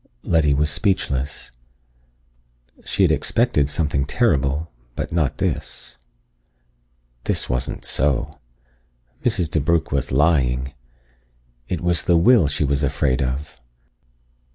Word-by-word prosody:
Letty 75 -4 +2
was 75 +1 +1
speechless. 75 -7 -1 1.3
She - - 0
had - - +4
expected 110 - +1
something 75 -2 0
terrible, 75 - +1 0.2
but - - -4
not 80 -5 0
this. - - -3 1.3
This - - 0
wasn't 60 0 -3
so! 70 -1 0 0.8
Mrs. 85 - +1
DeBrugh 80 +1 +1
was 70 -2 -1
lying! 65 -3 +2 0.9
It 90 - -3
was 85 -1 +1
the 85 - +4
will 95 -1 +5
she 75 +1 -1
was 70 0 0
afraid 70 -2 0
of. 65 +3 -4
75 Hz, 105 wpm, -21 LUFS, 70-85 Hz, 1.3 s, will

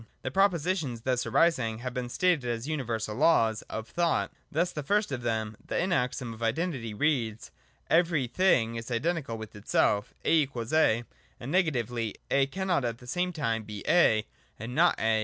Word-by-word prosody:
The 130 - -3
propositions 170 - +1
thus 125 +1 0
arising 125 -10 +2
have 125 +2 -5
been 125 -1 -3
stated 165 -4 +1
as 115 +2 -3
universal 115 -8 -2
Laws 115 -5 +3
of 110 0 -5
Thought. 170 +8 0 0.2
Thus 175 +4 +1
the 150 - -4
first 205 +5 +1
of 130 -2 -3
them, 110 -2 -2
the - - -1
maxim 125 -7 -1
of 110 - -13
Identity, 120 0 -1
reads: 115 -3 -1 0.4
Every 165 -5 +3
thing 120 -6 +2
is 115 +1 -6
identical 135 -1 -1
with 110 0 -9
itself, 105 0 +1
A=A: 135 -4 +2 0.4
and, 125 +4 -6
negatively, 120 - 0 0.2
A 140 -1 +3
cannot 180 -1 -1
at 120 -1 -2
the 125 - -15
same 180 +8 -1
time 115 -9 -1
be 105 -1 -8
A 110 -11 +4 0.3
and 115 +3 -6
not 170 +5 +3
A. 110 0 +2
125 Hz, 165 wpm, -28 LUFS, 115-165 Hz, 0.4 s, A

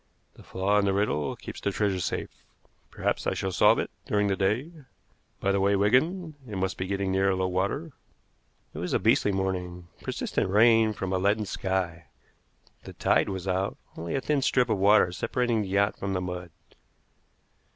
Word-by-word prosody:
The - - -16
flaw 100 +2 0
in 100 - +1
the 100 - +2
riddle 95 -8 0
keeps - - -9
the - - 0
treasure 100 -2 0
safe. 85 - -3 0.6
Perhaps - - -2
I - - 0
shall 95 - -2
solve - - +5
it - - -2 0.2
during 105 -1 +1
the 95 - +1
day. 110 - 0 0.7
By 100 - +1
the 100 - +1
way, 100 +1 +3
Wigan, 155 - +2 0.2
it 105 - -5
must 95 0 -1
be 95 - -4
getting 100 0 -1
near 95 0 +2
low 95 0 0
water." 100 - -2 0.8
It - - -7
was - - -3
a - - +3
beastly 105 - +3
morning, 90 -2 -3
persistent - - -2
rain 110 +2 +5
from 95 -2 -4
a 95 - +1
leaden 105 +3 +1
sky. 95 -4 -2 0.8
The - - -10
tide - - +2
was 95 -1 -5
out, 95 +1 -1 0.2
only 85 +1 -4
a 135 - 0
thin 145 0 0
strip 125 -2 +2
of 105 - +1
water 100 -2 +5
separating 120 +4 0
the 100 - -4
yacht 100 +1 +1
from 100 0 -2
the 90 - -1
mud. 90 -1 -5
100 Hz, 185 wpm, -27 LUFS, 95-105 Hz, 0.8 s, solve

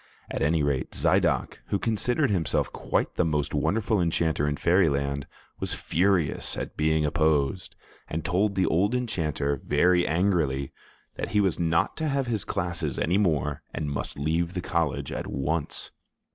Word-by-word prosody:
At - - -3
any 75 +2 +2
rate, 70 -3 -1
Zidoc, - - +1
who 100 - 0
considered 120 +6 +1
himself 85 -6 0
quite - - -1
the - - +3
most 75 -3 0
wonderful 105 +7 +1
enchanter 80 -3 +1
in 75 - 0
Fairyland, 70 -6 +2 0.3
was - - -2
furious 90 -2 0
at - - -5
being 80 0 +2
opposed, 80 +1 +1 0.3
and 80 0 -4
told 95 +4 +1
the 95 -1 +2
old 100 +8 +2
enchanter, 75 - -1
very 90 0 +3
angrily, 80 -6 +1 0.5
that - - -4
he 105 - +4
was 95 -4 +1
not 85 -1 +1
to 160 0 -1
have 140 -2 0
his 110 -5 -1
classes 85 -7 -2
any 90 +5 +2
more 75 -7 0
and 75 -2 -2
must 70 - -4
leave 85 +5 -1
the 90 - -1
college 80 -6 -1
at - - -4
once. 75 +3 -2
85 Hz, 160 wpm, -26 LUFS, 75-95 Hz, 0.5 s, he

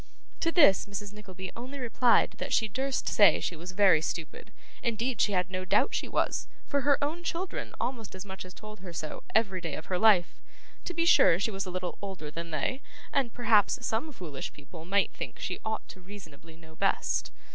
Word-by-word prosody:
To 330 - +1
this, 285 - +5
Mrs. 205 0 -6
Nickleby 190 -3 -8
only 255 +4 -7
replied 245 -1 +3
that - - -4
she 220 - +3
durst 265 +5 -2
say 205 -2 +6
she 175 - -3
was 175 +3 -7
very 185 -5 +5
stupid, 160 -1 -5 0.3
indeed 235 0 -1
she 205 - +2
had 185 0 0
no 185 0 -2
doubt 185 - +2
she - - -1
was, - - 0 0.2
for 285 -1 0
her 285 +1 +4
own 320 +4 -2
children 350 +2 -4
almost 230 -6 -3
as 185 +1 -7
much 190 -1 -7
as 185 0 -12
told 215 0 -10
her 180 -2 -9
so, 155 -2 -5
every 195 -5 +2
day 165 -3 -3
of 160 +4 -6
her 180 - +1
life; 205 -6 +4 0.4
to 355 - -4
be 335 0 +1
sure 170 - +6
she 215 +3 0
was 195 -1 -3
a - - -4
little 180 0 -4
older 190 -7 -6
than 170 +2 -6
they, 165 - -2 0.3
and 265 -4 +1
perhaps 235 +1 +3
some 230 +9 -1
foolish 165 - -6
people 160 +3 -11
might 200 +3 +2
think - - -6
she - - -4
ought 220 0 -4
reasonably 175 -5 -12
to - - -19
know 160 -1 -15
best. - - 0
200 Hz, 205 wpm, -29 LUFS, 180-235 Hz, 0.4 s, say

